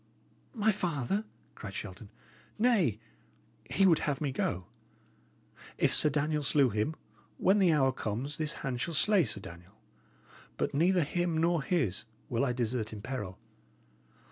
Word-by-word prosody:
"My 220 Hz, -1 st, +3 dB
father?" 185 Hz, -, -1 dB, 0.3 s
cried -, -, -8 dB
Shelton. -, -, -7 dB, 0.5 s
"Nay, 210 Hz, -, +3 dB, 0.7 s
he 195 Hz, -, +3 dB
would 170 Hz, -4 st, +5 dB
have 145 Hz, -2 st, -1 dB
me 145 Hz, -3 st, -1 dB
go! 95 Hz, -7 st, -2 dB, 1.1 s
If -, -, +2 dB
Sir 150 Hz, -, +6 dB
Daniel 150 Hz, +1 st, 0 dB
slew 140 Hz, -3 st, +3 dB
him, 110 Hz, +10 st, -1 dB, 0.4 s
when 195 Hz, +3 st, +3 dB
the 185 Hz, -4 st, +5 dB
hour 135 Hz, -4 st, +3 dB
comes 125 Hz, +5 st, -4 dB
this 155 Hz, 0 st, +1 dB
hand 125 Hz, -2 st, -2 dB
shall 165 Hz, +2 st, -1 dB
slay 200 Hz, +1 st, +4 dB
Sir 105 Hz, -3 st, -3 dB
Daniel; 90 Hz, +4 st, -12 dB, 0.8 s
but -, -, -1 dB
neither 175 Hz, +4 st, +3 dB
him 175 Hz, +2 st, -1 dB
nor 165 Hz, 0 st, +2 dB
his 130 Hz, -, 0 dB, 0.2 s
will 120 Hz, +1 st, 0 dB
I 130 Hz, -, +1 dB
desert 120 Hz, -2 st, -2 dB
in 105 Hz, -2 st, -8 dB
peril. 105 Hz, -9 st, -5 dB
145 Hz, 145 wpm, -31 LUFS, 120-175 Hz, 1.1 s, Sir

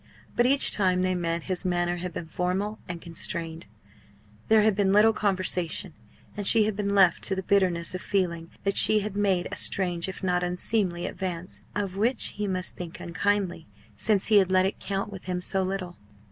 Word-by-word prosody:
But 240 Hz, -, +3 dB
each 275 Hz, +1 st, +3 dB
time 185 Hz, -2 st, +2 dB
they 185 Hz, 0 st, +1 dB
met 170 Hz, -2 st, -2 dB
his 185 Hz, -2 st, -2 dB
manner 175 Hz, -1 st, 0 dB
had 180 Hz, +1 st, -5 dB
been 165 Hz, -, -6 dB
formal 185 Hz, +6 st, -2 dB
and 175 Hz, -1 st, -5 dB
constrained; 165 Hz, -1 st, -3 dB, 0.8 s
there 220 Hz, -1 st, +5 dB
had 215 Hz, -2 st, +3 dB
been 195 Hz, -1 st, +2 dB
little 215 Hz, +2 st, +5 dB
conversation; 185 Hz, -3 st, -1 dB, 0.4 s
and 205 Hz, -1 st, 0 dB
she 220 Hz, -, +7 dB
had 210 Hz, -1 st, -1 dB
been 200 Hz, 0 st, -1 dB
left 190 Hz, -4 st, +4 dB
to 190 Hz, -, -1 dB
the 190 Hz, -, -4 dB
bitterness 185 Hz, -4 st, +1 dB
of 185 Hz, -, -5 dB
feeling 170 Hz, -4 st, -2 dB
that 200 Hz, 0 st, -1 dB
she 215 Hz, -1 st, +6 dB
had 205 Hz, -1 st, -5 dB
made 195 Hz, -3 st, +1 dB
a -, -, -4 dB
strange 180 Hz, -2 st, +1 dB
if 190 Hz, -, -9 dB
not 180 Hz, -1 st, +1 dB
unseemly 180 Hz, 0 st, -1 dB
advance, 180 Hz, -1 st, -5 dB
of 195 Hz, -2 st, -3 dB
which 235 Hz, +6 st, +2 dB
he 210 Hz, 0 st, -4 dB
must 185 Hz, -1 st, -1 dB
think 175 Hz, -2 st, -8 dB
unkindly, 180 Hz, 0 st, -2 dB, 0.3 s
since 200 Hz, -, +1 dB
he 215 Hz, -2 st, +5 dB
had 190 Hz, -1 st, +1 dB
let 185 Hz, 0 st, +4 dB
it 195 Hz, -, -3 dB
count 195 Hz, +1 st, -3 dB
with 195 Hz, -2 st, -10 dB
him 180 Hz, -1 st, -2 dB
so 190 Hz, +2 st, +1 dB
little. 185 Hz, -2 st, -4 dB
185 Hz, 195 wpm, -26 LUFS, 175-200 Hz, 0.8 s, she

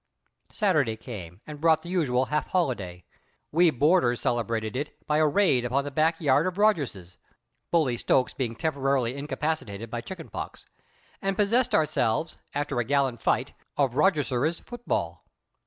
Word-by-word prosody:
Saturday 155 Hz, -, +1 dB
came, 100 Hz, -6 st, -9 dB
and 150 Hz, -1 st, -9 dB
brought 160 Hz, -1 st, +4 dB
the 170 Hz, -, -8 dB
usual 135 Hz, -8 st, +1 dB
half 150 Hz, +4 st, -1 dB
holiday. 100 Hz, -, -2 dB, 0.5 s
We 170 Hz, +2 st, +5 dB
boarders 145 Hz, -3 st, +3 dB
celebrated 115 Hz, -1 st, -1 dB
it 140 Hz, +3 st, -4 dB
by 150 Hz, -, +1 dB
a 155 Hz, -, +4 dB
raid 145 Hz, -6 st, +3 dB
upon 130 Hz, +3 st, 0 dB
the 145 Hz, -, -5 dB
back 160 Hz, +3 st, +2 dB
yard 145 Hz, +2 st, +3 dB
of 185 Hz, 0 st, -3 dB
Rogerses 140 Hz, -, 0 dB, 0.5 s
Bully 150 Hz, -8 st, +2 dB
Stokes 125 Hz, +2 st, +1 dB
being 120 Hz, -4 st, -3 dB
temporarily 135 Hz, -4 st, 0 dB
incapacitated 140 Hz, -7 st, -3 dB
by 120 Hz, -, -3 dB
chicken 175 Hz, +5 st, -8 dB
pox -, -, -7 dB, 0.6 s
and 195 Hz, -1 st, -1 dB
possessed 225 Hz, +5 st, +2 dB
ourselves, 155 Hz, -1 st, 0 dB, 0.2 s
after 145 Hz, -3 st, -1 dB
a -, -, +2 dB
gallant 135 Hz, -2 st, 0 dB
fight, -, -, 0 dB, 0.2 s
of 135 Hz, -4 st, +2 dB
Rogerses' 150 Hz, -2 st, +1 dB
football. 240 Hz, 0 st, -3 dB
140 Hz, 150 wpm, -27 LUFS, 120-165 Hz, 0.6 s, We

